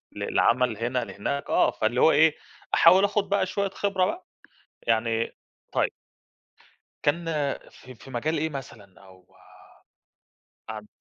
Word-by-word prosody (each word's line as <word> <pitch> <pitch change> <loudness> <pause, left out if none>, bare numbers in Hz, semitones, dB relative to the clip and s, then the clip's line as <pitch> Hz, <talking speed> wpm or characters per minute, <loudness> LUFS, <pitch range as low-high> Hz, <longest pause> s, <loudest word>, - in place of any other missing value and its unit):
لعمل 120 -2 +1
هنا 120 +3 -1
لهناك، 140 +8 -4
آه، - - +3
فاللي 115 +3 0
هو 160 - +7
إيه، 155 +1 +5 0.4
أحاول 185 +4 +7
آخد 205 -1 +1
بقى 200 -1 +2
شوية 200 +1 -2
خبرة 195 -1 0
بقى، 345 - -4 0.6
يعني 115 0 0 0.4
طيب - - +1 1.1
كان 165 +4 +1 0.4
في 130 0 -14
في 125 - -15
مجال 155 +6 -1
إيه 160 +2 -1
مثلًا 110 -10 -10
أو 95 -1 -20 1.3
عن 105 -1 -7
135 Hz, 125 wpm, -26 LUFS, 115-175 Hz, 1.3 s, هو